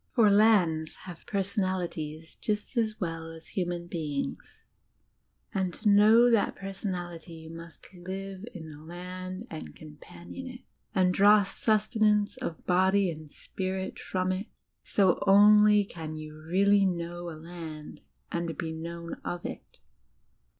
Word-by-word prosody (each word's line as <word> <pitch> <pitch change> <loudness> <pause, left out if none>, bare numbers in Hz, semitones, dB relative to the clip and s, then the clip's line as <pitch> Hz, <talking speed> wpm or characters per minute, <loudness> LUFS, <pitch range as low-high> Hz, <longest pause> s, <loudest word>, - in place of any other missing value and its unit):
For 220 -5 +6
lands 190 -7 +4
have 175 -3 -10
personali 190 -2 0
ties 155 +1 -7
just 210 +3 -3
as 220 -2 0
well 165 -3 -4
as 165 0 -12
human 175 -2 -2
beings; 155 -5 -5 0.9
and 190 -2 -1
k> 220 - -3
know 215 +4 +7
that 225 -3 +2
personal 190 -2 -4
ity 165 0 -10
you 160 0 -10
must 165 +2 -12
live 190 +2 -6
in 160 -6 -9
the 150 -1 -11
land 185 +4 -7
and 160 - -7
companion 155 - -10
it, 250 0 -9 0.3
and 185 -1 +3
draw 205 +2 +6
sustenance 210 +1 +2
of 170 -11 -5
body 190 +1 +3
and 155 -1 -9
spirit 190 +4 -4
from 185 0 -1
it; 185 +3 -3 0.4
so 190 -3 +2
only 210 +1 +7
can 160 -4 -7
you 155 0 -8
really 200 +2 +4
know 175 -1 -4
a 160 - -8
land 160 -2 -9 0.3
and 170 -1 -2
be 165 -2 -3
known 170 +1 -6
of 175 0 -4
it. - - -8
185 Hz, 140 wpm, -29 LUFS, 165-200 Hz, 0.9 s, know